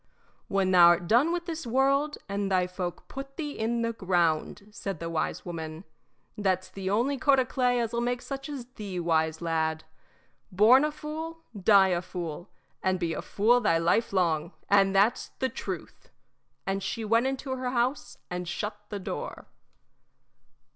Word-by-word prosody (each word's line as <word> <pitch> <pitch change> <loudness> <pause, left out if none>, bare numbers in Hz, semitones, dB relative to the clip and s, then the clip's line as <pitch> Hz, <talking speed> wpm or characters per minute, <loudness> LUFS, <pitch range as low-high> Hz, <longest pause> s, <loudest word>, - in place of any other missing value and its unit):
"When 195 -1 +1
thou 175 -2 +8
'rt 175 0 -4
done 245 - +4
with 345 0 -2
this 330 -6 -5
world, 275 +4 +2
and 200 0 -2
thy 185 -1 +3
folk 180 -1 -5
put 275 0 -8
thee 300 -3 -3
in 235 -1 -1
the 230 0 -1
ground," 180 0 0
said 195 -4 -5
the 165 0 -4
wise 165 - -2
woman. 160 -1 -6 0.5
"That's 185 -2 0
the 190 -1 -4
only 250 +7 +1
coat 280 -2 +4
o' 255 - +2
clay 250 -1 +1
as 230 -1 -2
'll 235 - 0
make 245 0 -1
such 275 +1 -6
as 275 -5 -5
thee 210 -7 -6
wise, 160 -1 0
lad. 160 -1 0 0.7
Born 220 +9 +6
a 300 - +1
fool, 320 +2 -6
die 195 -1 +5
a 175 -1 +1
fool, 175 -1 -6 0.3
and 185 -1 +1
be 170 -2 -1
a - - -3
fool 235 +4 +3
thy 165 -7 +3
life 170 +8 +2
long, 170 -4 +1
and 195 -1 +4
that's 210 +6 +3
the 260 - 0
truth!" - - -7 0.6
And 195 0 -1
she 225 +3 -3
went 230 +4 +3
into 265 0 -3
the 255 -1 -3
house 250 +3 -1
and 180 0 -4
shut 210 +4 -4
the 205 - -4
door. 190 - -6
205 Hz, 175 wpm, -28 LUFS, 180-255 Hz, 0.7 s, thou